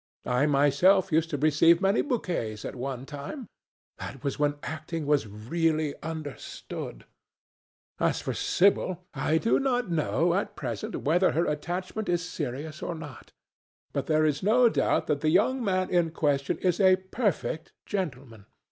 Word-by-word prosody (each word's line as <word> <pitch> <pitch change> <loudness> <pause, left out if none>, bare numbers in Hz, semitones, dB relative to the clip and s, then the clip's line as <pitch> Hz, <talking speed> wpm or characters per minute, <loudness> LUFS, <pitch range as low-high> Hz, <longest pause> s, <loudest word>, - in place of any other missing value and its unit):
I 125 +4 +2
myself 145 +7 +4
used 160 +1 +2
to 150 - -2
receive 155 +3 +4
many 195 +2 +3
bouquets 170 - -2
at - - -4
one 130 0 -4
time. 145 - -7 0.5
That 135 - -7
was 140 -1 -2
when 145 0 +2
acting 155 +1 -4
was 145 -5 +2
really 155 +8 -1
understood. 155 - -7 0.9
As - - +1
for - - -3
Sibyl, 185 -1 +2
I 150 +3 +1
do 225 +8 +2
not 245 -7 0
know 165 +1 +1
at 195 +3 -1
present 120 -7 -4
whether 175 +5 +3
her 165 +3 +2
attachment 180 +7 -3
is 175 0 0
serious 150 +1 -5
or 175 - -3
not. 150 -5 -10 0.6
But - - -2
there 155 0 +3
is 150 -2 +1
no 235 +5 +5
doubt - - +1
that 145 -1 -1
the 155 - +2
young 240 +9 +2
man 185 -3 0
in 175 -2 +3
question 145 -3 0
is 180 -2 0
a 190 -2 +6
perfect 190 -4 -2
gentleman. 130 - -5
160 Hz, 155 wpm, -27 LUFS, 145-185 Hz, 0.9 s, a